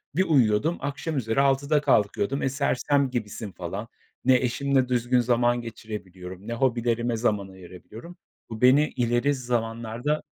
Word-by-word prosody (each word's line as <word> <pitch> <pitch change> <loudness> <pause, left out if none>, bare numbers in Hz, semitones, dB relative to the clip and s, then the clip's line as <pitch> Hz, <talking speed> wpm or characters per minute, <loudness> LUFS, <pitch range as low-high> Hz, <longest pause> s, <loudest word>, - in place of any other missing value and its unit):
Bir 185 - +3
uyuyordum, 140 - +2
akşam 145 +2 -3
üzeri 115 +1 +1
altıda 140 +2 +2
kalkıyordum. 125 -1 +1
Eee, 135 - +1
sersem 140 0 +1
gibisin 110 -3 -5
falan. 95 +5 -6 0.4
Ne 130 0 +6
eşimle 130 +1 +1
düzgün 125 0 +2
zaman 120 0 +2
geçirebiliyorum, 100 -4 -9
ne 115 - -3
hobilerime 120 -1 0
zaman 105 -4 0
ayırabiliyorum. 95 - -12 0.3
Bu 110 -1 -7
beni 135 +4 +5
ileri 120 +3 +1
zamanlarda 120 +2 -2
120 Hz, 135 wpm, -25 LUFS, 110-135 Hz, 0.4 s, Ne